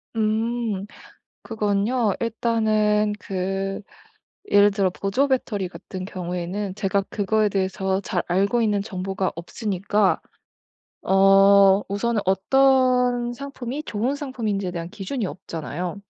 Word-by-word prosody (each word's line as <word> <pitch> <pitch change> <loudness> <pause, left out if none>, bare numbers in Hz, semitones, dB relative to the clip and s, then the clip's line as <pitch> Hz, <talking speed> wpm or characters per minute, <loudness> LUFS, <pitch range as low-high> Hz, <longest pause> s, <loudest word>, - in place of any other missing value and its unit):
음 220 -1 -1 0.6
그건요 215 +1 0
일단은 215 -2 +1
그 195 +1 -3 0.7
예를 205 0 +6
들어 195 -1 +1
보조 200 +9 0
배터리 215 -7 -1
같은 185 +1 -8
경우에는 185 +1 -4
제가 200 -1 0
그거에 215 +1 +1
대해서 190 0 -1
잘 - - -2
알고 200 +6 +2
있는 210 -3 +1
정보가 190 -1 -3
없으니까 195 +3 0 0.8
어 195 0 +6
우선은 210 +2 -1
어떤 250 +4 +3
상품이 275 +1 -6
좋은 240 +5 -1
상품인지에 220 -10 -3
대한 170 -1 -5
기준이 215 +5 -4
없잖아요. 175 +2 -5
205 Hz, 255 characters per minute, -23 LUFS, 190-230 Hz, 0.8 s, 예를